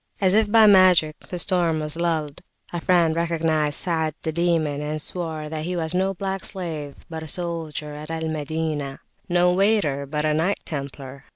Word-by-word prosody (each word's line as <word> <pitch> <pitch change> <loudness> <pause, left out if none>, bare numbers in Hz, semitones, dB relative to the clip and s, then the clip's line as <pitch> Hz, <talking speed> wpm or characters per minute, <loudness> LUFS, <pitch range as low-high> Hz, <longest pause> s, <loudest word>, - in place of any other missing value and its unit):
As 190 -2 +3
if 215 -1 +3
by 225 -1 +7
magic, 185 -6 +6
the 180 - -4
storm 175 -3 +1
was 150 0 -1
lulled. 160 -3 -2 0.3
A 175 - -3
friend 170 -3 +3
recognised 160 -3 0
Sa'ad 160 -3 -1
the 160 - -1
Demon, 160 -3 0
and 150 +1 -3
swore 160 -1 -4
that 155 0 -4
he 180 +1 -2
was 160 -1 -2
no 190 +1 0
black 195 +1 -3
slave, 160 -7 -4
but 160 -1 -6
a 160 - -7
soldier 160 -3 -2
at 150 +1 -8
Al 160 0 -3
Madinah 155 -2 -3 0.3
"no 180 0 +3
waiter, 180 -8 +2
but 150 +2 -2
a 155 - +2
Knight 165 +6 +1
Templar." 140 -2 -7
160 Hz, 180 wpm, -23 LUFS, 150-180 Hz, 0.3 s, by